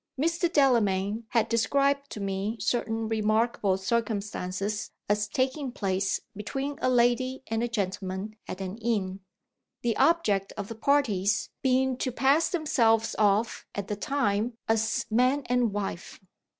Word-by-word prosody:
Mr. 335 Hz, +3 st, +1 dB
Delamayn 220 Hz, -, +2 dB
had 230 Hz, -2 st, +2 dB
described 280 Hz, +5 st, +1 dB
to -, -, -7 dB
me 200 Hz, +3 st, -2 dB
certain 225 Hz, -2 st, -1 dB
remarkable 215 Hz, -2 st, +1 dB
circumstances 205 Hz, -1 st, -2 dB, 0.2 s
as 210 Hz, 0 st, +1 dB
taking 260 Hz, +4 st, -1 dB
place 195 Hz, -3 st, -1 dB
between 270 Hz, +8 st, -4 dB
a -, -, +2 dB
lady 255 Hz, +2 st, +2 dB
and 225 Hz, 0 st, -2 dB
a 240 Hz, -, +1 dB
gentleman 195 Hz, -1 st, -3 dB
at 185 Hz, -, -6 dB
an 190 Hz, +3 st, -5 dB
inn: 205 Hz, -5 st, -1 dB, 0.6 s
the 235 Hz, -2 st, +1 dB
object 225 Hz, -, +2 dB
of 205 Hz, -1 st, -5 dB
the -, -, -4 dB
parties 220 Hz, -7 st, +1 dB
being 260 Hz, 0 st, +2 dB
to 255 Hz, -, -1 dB
pass 270 Hz, +6 st, +3 dB
themselves 230 Hz, -10 st, +2 dB
off 210 Hz, +2 st, +2 dB
at 200 Hz, -1 st, -4 dB
the 210 Hz, -, -1 dB
time 225 Hz, -1 st, -1 dB
as 220 Hz, 0 st, +1 dB
man 255 Hz, +5 st, +3 dB
and 245 Hz, -2 st, +1 dB
wife. 200 Hz, -3 st, -5 dB
225 Hz, 135 wpm, -28 LUFS, 205-255 Hz, 0.6 s, pass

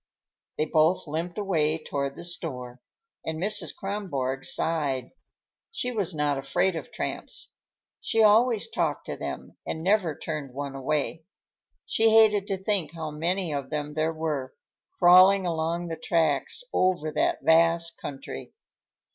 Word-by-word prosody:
They 155 Hz, -, +1 dB
both 160 Hz, +3 st, +2 dB
limped 165 Hz, +4 st, -4 dB
away 160 Hz, -7 st, +1 dB
toward 140 Hz, -3 st, -3 dB
the 170 Hz, -, -9 dB
store, 130 Hz, -8 st, -3 dB, 0.4 s
and 160 Hz, 0 st, -3 dB
Mrs. 205 Hz, +5 st, +1 dB
Kronborg 140 Hz, -10 st, -3 dB
sighed. 145 Hz, -6 st, 0 dB, 0.6 s
She 250 Hz, -, -3 dB
was 195 Hz, -7 st, -1 dB
not 145 Hz, -2 st, 0 dB
afraid 175 Hz, +7 st, +1 dB
of 160 Hz, -, -6 dB
tramps. -, -, -4 dB, 0.5 s
She 225 Hz, -, +2 dB
always 220 Hz, +1 st, +4 dB
talked -, -, -2 dB
to -, -, -4 dB
them, -, -, -7 dB
and 160 Hz, -, -5 dB
never 185 Hz, -5 st, +2 dB
turned 150 Hz, -5 st, -5 dB
one 140 Hz, 0 st, -4 dB
away. 150 Hz, +3 st, -2 dB, 0.6 s
She 225 Hz, 0 st, +3 dB
hated 215 Hz, -2 st, +5 dB
to 195 Hz, -, -1 dB
think 190 Hz, -5 st, -1 dB
how 160 Hz, -2 st, -5 dB
many 170 Hz, +2 st, -1 dB
of 140 Hz, -2 st, -4 dB
them 150 Hz, -1 st, -3 dB
there 155 Hz, +1 st, 0 dB
were, 155 Hz, -5 st, -3 dB, 0.4 s
crawling 185 Hz, +2 st, +7 dB
along 170 Hz, +1 st, -1 dB
the 165 Hz, -, -4 dB
tracks 170 Hz, -, 0 dB
over 180 Hz, -4 st, +1 dB
that -, -, 0 dB
vast 165 Hz, +2 st, +3 dB
country. 135 Hz, -2 st, -7 dB
165 Hz, 140 wpm, -26 LUFS, 150-190 Hz, 0.6 s, crawling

